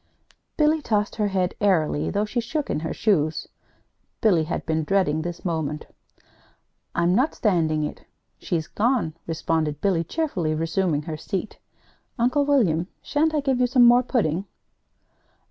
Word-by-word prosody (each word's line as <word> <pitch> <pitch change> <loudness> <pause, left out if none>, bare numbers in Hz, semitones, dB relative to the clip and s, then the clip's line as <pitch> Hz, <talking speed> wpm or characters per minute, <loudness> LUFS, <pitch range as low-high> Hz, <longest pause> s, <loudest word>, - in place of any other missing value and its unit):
Billy 310 0 +3
tossed 210 -5 -1
her 210 -2 +1
head 190 -2 0
airily, 165 -7 +2
though 205 +1 0
she 225 +3 -2
shook 285 +6 -3
in - - -1
her 160 0 -4
shoes. 160 -7 0 0.7
Billy 175 -8 +3
had 160 - -4
been 160 -1 0
dreading 160 -3 +1
this 175 +2 -6
moment. 160 -3 -2 1.1
"I'm 170 +1 +2
not 260 +10 +2
standing 160 -7 +1
it. 150 - -6 0.3
She's 165 -3 -2
gone," 225 - 0
responded 160 -2 -1
Billy, 180 -3 +1
cheerfully, 175 - -2
resuming 165 -1 0
her 155 -1 -5
seat. 195 +5 -5 0.6
"Uncle 255 +4 +2
William, 185 - +2 0.2
sha'n't 315 +1 +1
I 300 - +1
give 270 -3 0
you 250 - +3
some 245 0 +5
more 240 +1 +7
pudding?" 200 - 0
190 Hz, 145 wpm, -24 LUFS, 160-240 Hz, 1.1 s, more